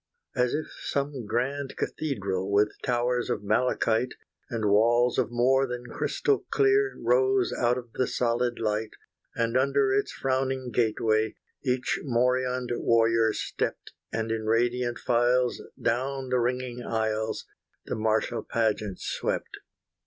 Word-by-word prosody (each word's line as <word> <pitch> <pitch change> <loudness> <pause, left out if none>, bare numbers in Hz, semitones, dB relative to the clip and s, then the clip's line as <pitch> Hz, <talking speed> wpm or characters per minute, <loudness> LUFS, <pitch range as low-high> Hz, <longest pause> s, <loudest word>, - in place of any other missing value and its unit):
As 125 0 +2
if 155 - -2 0.2
some 140 -5 -2
grand 135 +5 -2
cathedral, 100 -10 -2
With 105 +1 +4
towers 125 0 0
of - - -1
malachite, 115 +2 +1 0.3
And 115 -4 -2
walls 120 +4 +4
of - - +1
more 130 +3 +3
than 125 0 -5
crystal 420 - 0
clear, 405 0 +3
Rose 400 -5 +2
out 120 +1 +2
of 120 -2 -8
the 130 - 0
solid 120 0 0
light, 110 0 -1 0.5
And 115 0 0
under 135 0 +3
its 135 +1 +1
frowning 130 -1 -1
gateway, 110 -1 +1 0.3
Each 125 -2 0
morioned 125 0 +1
warrior 115 -1 +3
stept, - - -3 0.2
And 110 0 -2
in 110 -1 -2
radiant 120 +2 +1
files 125 +1 +2 0.2
down 130 +2 -1
the 125 0 +2
ringing 125 0 -2
aisles, 110 -1 -1 0.4
The - - -4
martial 110 +2 0
pageant 110 -4 -1
swept. - - -3
120 Hz, 130 wpm, -27 LUFS, 115-130 Hz, 0.5 s, With